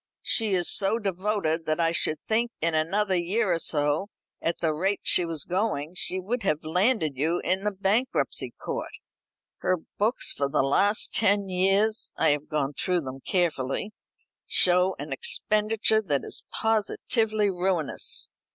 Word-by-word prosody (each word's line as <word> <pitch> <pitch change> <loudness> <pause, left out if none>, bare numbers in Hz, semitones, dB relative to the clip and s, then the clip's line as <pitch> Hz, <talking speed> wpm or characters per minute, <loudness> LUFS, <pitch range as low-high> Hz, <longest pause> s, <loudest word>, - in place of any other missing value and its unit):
"She 215 -4 +2
is 175 -2 +1
so 200 +2 +3
devoted, 190 -5 -2
that 155 +2 0
I 165 -1 +2
should 155 -2 +2
think 230 +2 +1
in 165 +1 +1
another 190 +6 +1
year 185 +3 0
or 165 - -1
so, 150 +4 0 0.3
at 170 - -1
the 160 -2 0
rate 190 +6 -1
she 180 - +3
was 165 -3 -3
going, 180 -5 -2
she 185 0 -1
would 230 +6 -3
have 155 -4 -1
landed 180 - +1
you 165 +5 0
in 185 +2 0
the 210 - 0
bankruptcy 200 +6 -1
court. - - -5 0.7
Her 185 - 0 0.2
books 220 +5 +1
for 140 0 -2
the 140 - +1
last 200 +10 +2
ten 200 -2 +2
years 195 +4 +1
I - - +3
have 150 0 -1
gone 145 -3 -1
through 180 +3 -1
them 135 -2 -7
carefully 170 +2 -1 0.6
show 180 +1 +4
an 145 0 -5
expenditure 215 +7 +2
that 145 -9 -1
is - - -6
positively 220 -1 0
ruinous. 180 -4 0
185 Hz, 155 wpm, -26 LUFS, 155-210 Hz, 0.7 s, show